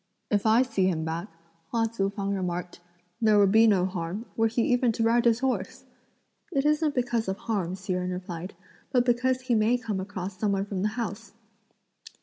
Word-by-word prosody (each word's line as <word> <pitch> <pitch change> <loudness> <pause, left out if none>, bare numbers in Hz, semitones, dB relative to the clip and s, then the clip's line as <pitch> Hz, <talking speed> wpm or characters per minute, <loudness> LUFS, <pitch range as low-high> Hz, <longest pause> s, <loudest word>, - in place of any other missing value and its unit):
"If 205 +1 +2
I 225 +3 +5
see 225 -7 0
him 160 -4 -1
back," 165 +4 -3 0.4
Hua 230 -1 +1
Tzu 220 -3 -1
fang 200 0 -3
remarked, 180 -2 -3 0.4
"there 215 -2 +5
would 200 -1 +5
be 220 +2 +6
no 190 -4 +3
harm, 185 +3 -4
were 225 0 +3
he 230 +1 0
even 245 0 +2
to 225 - -1
ride 235 +2 +3
his 235 +1 +3
horse!" 265 -1 -2 0.7
"It 275 -4 0
isn't 300 0 +2
because 240 -3 0
of 190 0 -2
harm," 190 -6 -2
Hsi 190 0 -4
Jen 180 0 -2
replied; 180 0 -6 0.4
"but 245 -1 +3
because 255 +1 +1
he 255 -1 -1
may 225 +2 +3
come 220 -5 -3
across 190 -1 -6
some 205 -2 +1
one 195 0 0
from 195 -2 -4
the 210 - +2
house." 225 -1 -5
210 Hz, 195 wpm, -27 LUFS, 190-235 Hz, 0.7 s, be